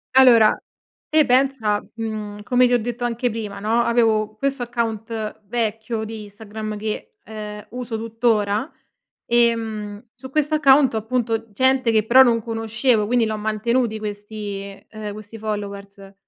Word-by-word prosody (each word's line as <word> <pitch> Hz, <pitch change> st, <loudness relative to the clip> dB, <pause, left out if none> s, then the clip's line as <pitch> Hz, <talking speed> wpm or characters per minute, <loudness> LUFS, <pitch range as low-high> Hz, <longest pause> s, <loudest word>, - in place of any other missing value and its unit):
Allora 235 Hz, -5 st, +7 dB, 0.5 s
te 310 Hz, -1 st, +4 dB
pensa, 250 Hz, -5 st, +2 dB
mhmm, 215 Hz, -2 st, -5 dB
come 250 Hz, +2 st, +4 dB
ti 245 Hz, -, +1 dB
ho 240 Hz, -, +4 dB
detto 240 Hz, +2 st, -4 dB
anche 240 Hz, 0 st, -1 dB
prima, 210 Hz, -3 st, -5 dB
no, 225 Hz, +3 st, +1 dB
avevo 220 Hz, -3 st, +2 dB
questo 275 Hz, +2 st, -1 dB
account 225 Hz, -2 st, -3 dB
vecchio 225 Hz, 0 st, -2 dB
di 220 Hz, -1 st, -7 dB
Instagram 215 Hz, +1 st, -7 dB
che, 220 Hz, -, -5 dB
ehm, 210 Hz, -1 st, -8 dB
uso 245 Hz, -2 st, -4 dB
tuttora 225 Hz, +1 st, 0 dB, 0.5 s
e, 235 Hz, -1 st, +4 dB
mhmm, 215 Hz, -1 st, -6 dB
su 260 Hz, -, -10 dB
questo 305 Hz, +1 st, +1 dB
account 275 Hz, -4 st, +5 dB
ho, -, -, 0 dB
appunto, 225 Hz, -1 st, -2 dB
gente 260 Hz, +1 st, +2 dB
che 215 Hz, -1 st, +3 dB
però 260 Hz, +3 st, +7 dB
non 230 Hz, -2 st, +2 dB
conoscevo. 225 Hz, 0 st, 0 dB
Quindi 240 Hz, 0 st, +2 dB
l'ho 220 Hz, 0 st, -2 dB
mantenuti 220 Hz, +2 st, 0 dB
questi 205 Hz, -1 st, -6 dB
ehm, 215 Hz, -2 st, -6 dB
questi 215 Hz, +1 st, -10 dB
followers. 200 Hz, -2 st, -6 dB
225 Hz, 145 wpm, -22 LUFS, 210-240 Hz, 0.5 s, Allora